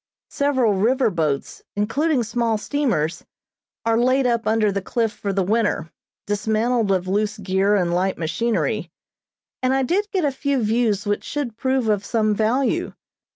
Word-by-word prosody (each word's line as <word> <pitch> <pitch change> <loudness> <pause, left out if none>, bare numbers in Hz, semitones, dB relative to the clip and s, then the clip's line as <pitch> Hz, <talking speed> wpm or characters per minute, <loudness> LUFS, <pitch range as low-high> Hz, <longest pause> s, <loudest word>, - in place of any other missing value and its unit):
Several 260 -6 +2
river 230 +5 +2
boats, 155 -5 -2
including 255 +7 +1
small 230 0 0
steamers, 210 - -1 0.6
are 230 0 +2
laid 255 +2 +3
up 235 -2 +1
under 215 -1 +2
the 195 0 -2
cliff 225 +3 -1
for 200 -1 -3
the 195 0 +1
winter, 205 -5 0 0.3
dismantled 220 +2 0
of 185 -1 0
loose 210 +3 0
gear 195 +1 +1
and 175 -3 +1
light 185 +2 0
machinery, 225 +8 -1 0.7
and 255 +1 +2
I 270 - +2
did 395 +10 0
get 370 -5 0
a 285 - +2
few 275 -1 -1
views 215 -2 +1
which 205 0 -1
should 280 -7 -4
prove 260 0 0
of 205 -2 +1
some 215 0 +1
value. 230 +6 0
220 Hz, 155 wpm, -22 LUFS, 200-255 Hz, 0.7 s, laid